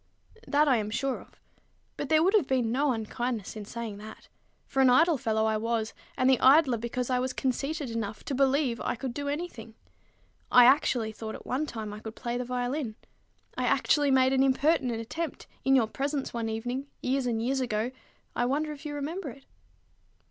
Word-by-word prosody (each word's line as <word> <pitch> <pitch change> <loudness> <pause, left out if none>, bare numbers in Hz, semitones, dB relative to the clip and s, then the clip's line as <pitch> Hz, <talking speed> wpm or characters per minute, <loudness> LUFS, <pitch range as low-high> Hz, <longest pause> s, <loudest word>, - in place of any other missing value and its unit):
"That 300 +1 +3
I 260 -4 +4
am 210 -1 -2
sure 265 +4 -2
of. - - -20 0.6
But 285 - -5
there 315 0 +5
would 380 +4 +3
have 410 -11 +4
been 250 -4 +1
no 280 +3 +2
unkindness 225 -1 -3
in 215 -1 -6
saying 225 -2 -6
that; 215 +1 -11 0.4
for 270 - 0
an 260 - +6
idle 325 +6 +5
fellow 220 -1 +1
I 220 0 +1
was, 225 0 -1 0.2
and 255 -1 +2
the 265 -2 +5
idler 265 -3 +5
because 240 +2 -3
I 250 - +2
was 255 0 -2
conceited 275 +1 -2
enough 220 -2 -4
to - - -4
believe 270 -2 +2
I - - -1
could 250 +1 -5
do 285 +1 -4
any 315 +5 -2
thing. 225 -7 -12 0.8
I 245 -1 +8
actually 250 -4 +3
thought 220 0 -7
at - - -11
one 285 +5 -1
time 220 -5 -6
I 210 - -7
could 220 +1 -8
play 240 -1 -4
the 250 - -1
violin. 250 -1 -2 0.6
I - - -1
actually 290 -2 +3
made 260 0 +4
an 265 - +3
impertinent 265 -3 +2
attempt 305 +7 -5 0.2
in 270 0 +4
your 250 -4 +4
presence 275 +5 -3
one 230 -1 -2
evening, 245 +5 -3 0.2
years 260 0 0
and 230 -2 0
years 260 +4 0
ago, 235 -1 -1 0.4
I 240 - +1
wonder 300 +4 0
if 300 +1 -8
you 290 - -5
remember 305 +3 -4
it." 270 +2 -13
255 Hz, 200 wpm, -28 LUFS, 230-280 Hz, 0.8 s, I